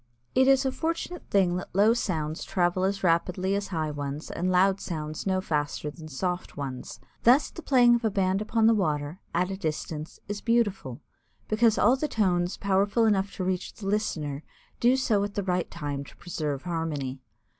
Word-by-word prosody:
It 260 0 +4
is 270 0 +5
a 265 - +1
fortunate 330 +5 -4
thing 180 -3 +3
that 180 - -8
low 210 +3 +5
sounds 160 -8 -2
travel 180 0 +1
as 195 0 -1
rapidly 180 +2 +1
as 200 0 -1
high 160 -4 -2
ones 145 +1 -5
and 180 +2 -1
loud 190 +2 +3
sounds 155 0 -4
no 190 -1 +1
faster 150 -3 -2
than 155 0 -11
soft 180 +5 -3
ones. 135 -3 -6 0.2
Thus 255 +5 +5
the 335 - -9
playing 245 -5 +5
of 235 0 +1
a 220 - +3
band 195 -1 +1
upon 220 +1 +1
the 225 - +6
water, 155 -4 -1 0.2
at 180 +2 +1
a 190 - -4
distance, 155 -2 -4
is 205 0 -4
beautiful, 205 - 0 0.5
because 220 0 +3
all 240 +5 +5
the 305 - -1
tones 180 -8 +1
powerful 200 +3 +2
enough 200 -2 +2
to 185 - -3
reach 185 0 -2
the 205 - -9
listener 160 -9 -1 0.4
do 245 +2 +4
so 215 -6 +2
at 205 0 -4
the 205 - -1
right 180 -1 -1
time 145 -4 -4
to - - -15
preserve 150 -5 -4
harmony. 155 -6 -3
185 Hz, 190 wpm, -27 LUFS, 155-215 Hz, 0.5 s, the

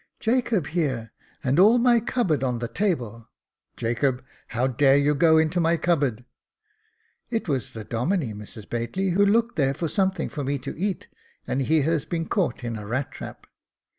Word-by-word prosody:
" - - -50
Jacob 225 - +1
here, 140 -7 -2 0.3
and 135 +4 +2
all 215 +6 +7
my 240 -1 +4
cupboard 205 - 0
on 125 -2 0
the 120 0 -3
table. 120 - -2 0.5
Jacob, 125 +3 0 0.2
how 120 +2 -1
dare 135 +2 +4
you 145 +1 +3
go 160 +1 +4
to 175 +3 -2
my 170 0 +2
cupboard? 140 -9 0 0.4
" 435 0 -43
" - - -42 0.2
It 225 -4 -2
was 135 -8 -2
the 110 - -6
Domine, 125 - -1
Mrs 105 +1 -10
Bately, 120 +12 -2
who 200 +4 +3
looked 230 +3 +2
there 135 -2 +2
for 165 - -2
something 190 +2 0
for 145 - -5
me 140 +1 -1
to 135 +1 -7
eat, 190 +3 -3 0.4
and 135 - -1
he 155 +4 +3
has 160 0 0
been 165 -1 -2
caught 180 -9 -1
in 115 -2 -3
a 105 -1 -8
rat 130 +5 -2
trap." - - -9
150 Hz, 190 wpm, -25 LUFS, 125-190 Hz, 0.5 s, all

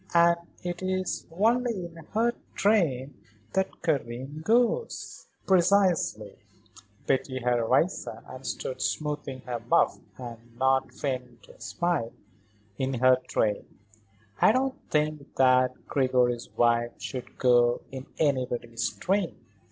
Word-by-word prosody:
And 170 0 +6 0.3
it 175 0 -4
is 185 0 -2
only 225 +1 +1
in 170 -1 -11 0.2
her 235 +2 +3 0.2
train 150 - +1 0.3
that 190 0 -1
Karen 140 -1 -2
goes." 245 - 0 0.2
"Precisely." 180 - +2 0.7
Betty 130 0 0
had 120 -1 +1
risen 130 +10 +1
and - - -10
stood - - -4
smoothing 145 -3 -2
her 120 0 -4
muff 115 - +2 0.2
and 120 -1 -10
not 130 +1 +2
feigning 125 -3 -4
to - - -18
smile. 170 -10 -1 0.7
"In 135 0 0
her 130 +1 +5
train. 105 -2 0 0.8
I - - +7
don't 260 +2 0
think 150 -1 -1
that 130 -1 +3
Gregory's 125 -3 +1
wife 120 0 +3
should 130 -2 -7
go 120 -1 +4
in 130 0 -7
anybody's 125 -5 0
train." 190 -1 -1
135 Hz, 115 wpm, -27 LUFS, 125-180 Hz, 0.8 s, I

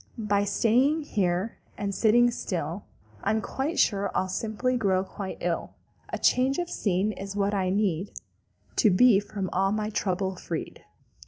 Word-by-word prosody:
"By 205 -2 +1
staying 250 +9 +2
here 190 -4 -1 0.2
and 200 -1 -2
sitting 240 +4 +4
still 175 -4 -4 0.4
I'm 220 - +1 0.4
sure 200 -7 +2
I'll 185 - 0
simply 225 +6 -1
grow 190 -5 +1
quite 195 0 -6
ill. 170 -1 -2 0.3
A - - -3
change 260 +2 +2
of 350 -1 -3
scene 195 +1 0
is 195 0 -7
what 200 0 +1
I 190 -2 0
need 195 -2 0 0.7
To 220 - +5
be 205 +2 +6
from 205 -2 -4
all 195 +1 +2
my 215 0 -1
trouble 190 -2 -1
freed." 165 -3 -6
200 Hz, 150 wpm, -27 LUFS, 190-220 Hz, 0.7 s, be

